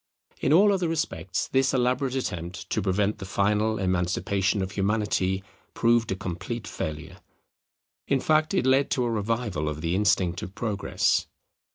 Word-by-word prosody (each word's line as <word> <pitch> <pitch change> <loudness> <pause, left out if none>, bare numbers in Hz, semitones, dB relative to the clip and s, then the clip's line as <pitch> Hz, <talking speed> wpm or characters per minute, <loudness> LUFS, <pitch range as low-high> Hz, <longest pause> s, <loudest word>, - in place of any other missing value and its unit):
In 135 - +1
all 200 +6 +6
other 185 -3 0
respects 155 - -2
this 135 0 +2
elaborate 130 +1 +1
attempt 90 -8 -4
to - - +1
prevent 100 +2 0
the - - -6
final 105 +3 +1
emancipation 95 +2 0
of 95 - -5
Humanity 100 -2 0 0.3
proved 115 -2 +2
a - - 0
complete 95 +6 -5
failure; 80 +4 -5 0.9
in 135 - +2
fact, 155 +5 +2
it 185 - +2
led 135 +1 +3
to 125 - +1
a 120 - 0
revival 105 -7 -1
of 75 0 -5
the 85 +1 -1
instinct 95 -3 +2
of 95 - -8
Progress. 105 -3 0
105 Hz, 155 wpm, -26 LUFS, 95-125 Hz, 0.9 s, all